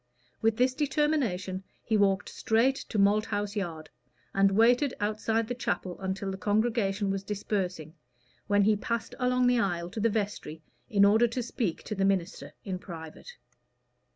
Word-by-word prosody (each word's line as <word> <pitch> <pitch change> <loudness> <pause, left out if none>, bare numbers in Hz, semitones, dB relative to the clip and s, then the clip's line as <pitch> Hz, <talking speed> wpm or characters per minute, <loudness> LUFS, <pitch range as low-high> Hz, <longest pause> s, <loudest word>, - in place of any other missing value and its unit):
With 220 0 +2
this 255 +1 +3
determination 265 -11 0 0.2
he 220 - 0
walked 200 -1 +2
straight 235 +5 +2
to 220 - -3
Malthouse 205 0 +1
Yard, 165 -6 -4 0.4
and 195 0 +4
waited 245 +6 +4
outside 215 +1 0
the 245 - -2
chapel 185 -6 -3
until 195 +1 -3
the 190 - -6
congregation 205 -1 +1
was 195 0 -2
dispersing, 190 -6 -3 0.5
when 205 -1 +4
he 215 +1 +4
passed 230 +2 -3
along 250 0 +2
the 245 -1 +4
aisle 175 -4 -1
to 220 - -5
the 230 +2 +3
vestry 200 -7 -3 0.3
in 200 -4 +5
order 220 +4 +5
to 235 +2 -3
speak 220 -6 -3
to - - -4
the 195 -2 -1
minister 195 -2 -1
in 185 -2 -3
private. 170 - -10
205 Hz, 155 wpm, -29 LUFS, 195-230 Hz, 0.5 s, in